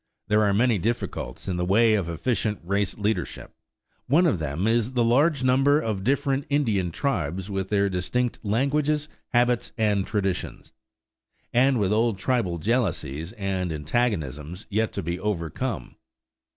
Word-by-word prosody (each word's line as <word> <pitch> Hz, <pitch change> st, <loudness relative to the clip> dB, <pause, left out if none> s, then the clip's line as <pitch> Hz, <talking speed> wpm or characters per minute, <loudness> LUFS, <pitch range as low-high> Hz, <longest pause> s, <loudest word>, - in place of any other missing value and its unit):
There 105 Hz, 0 st, +4 dB
are 105 Hz, -1 st, +3 dB
many 115 Hz, +1 st, +3 dB
difficulties 110 Hz, -, -3 dB
in 90 Hz, -2 st, -1 dB
the 90 Hz, -, 0 dB
way 110 Hz, +5 st, +4 dB
of 95 Hz, -6 st, 0 dB
efficient 105 Hz, +4 st, -1 dB
race 100 Hz, +2 st, -1 dB
leadership; 105 Hz, +1 st, -2 dB, 0.5 s
one 160 Hz, +7 st, +4 dB
of 140 Hz, -, +2 dB
them 75 Hz, +4 st, -2 dB
is 115 Hz, +2 st, +1 dB
the 120 Hz, -2 st, +2 dB
large 140 Hz, +4 st, +3 dB
number 135 Hz, +3 st, +4 dB
of 105 Hz, -8 st, -2 dB
different 135 Hz, +2 st, 0 dB
Indian 110 Hz, -11 st, +1 dB
tribes 95 Hz, -, -2 dB
with 95 Hz, -1 st, -2 dB
their 100 Hz, -1 st, +2 dB
distinct 105 Hz, +7 st, -1 dB
languages, 145 Hz, +7 st, +1 dB, 0.2 s
habits, 120 Hz, -1 st, +1 dB
and 105 Hz, -3 st, +1 dB
traditions, 100 Hz, -4 st, -3 dB, 0.8 s
and 130 Hz, +1 st, +4 dB
with 100 Hz, 0 st, +1 dB
old 115 Hz, -1 st, +2 dB
tribal 100 Hz, -5 st, 0 dB
jealousies 90 Hz, -, -1 dB
and 95 Hz, -5 st, -2 dB
antagonisms 80 Hz, -, -2 dB
yet 110 Hz, +2 st, +1 dB
to -, -, -3 dB
be 85 Hz, +2 st, -3 dB
overcome. 100 Hz, -, -3 dB
105 Hz, 145 wpm, -25 LUFS, 95-125 Hz, 0.8 s, There